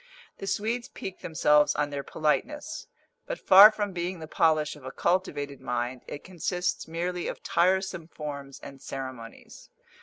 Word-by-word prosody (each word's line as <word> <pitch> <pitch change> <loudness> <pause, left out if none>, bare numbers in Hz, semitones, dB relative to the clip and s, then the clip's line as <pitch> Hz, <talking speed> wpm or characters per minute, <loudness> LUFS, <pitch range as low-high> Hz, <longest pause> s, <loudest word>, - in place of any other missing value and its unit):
The 195 - -6
Swedes 225 +5 -1
pique 190 - -7
themselves 150 -2 +3
on 145 0 0
their 140 -1 -3
politeness; 295 - -2 0.4
but - - -3
far 200 +3 +9
from 205 -2 -3
being 180 +1 -3
the 160 -1 -8
polish 155 -1 +2
of 150 - -15
a 130 - -6
cultivated 145 -7 -1
mind, 125 0 -3
it 145 - -7
consists 180 0 -2
merely 175 +2 -3
of - - -6
tiresome 185 -1 +1
forms 140 -4 -7
and 140 -1 -11
ceremonies. 130 -4 -8
160 Hz, 150 wpm, -27 LUFS, 140-185 Hz, 0.4 s, far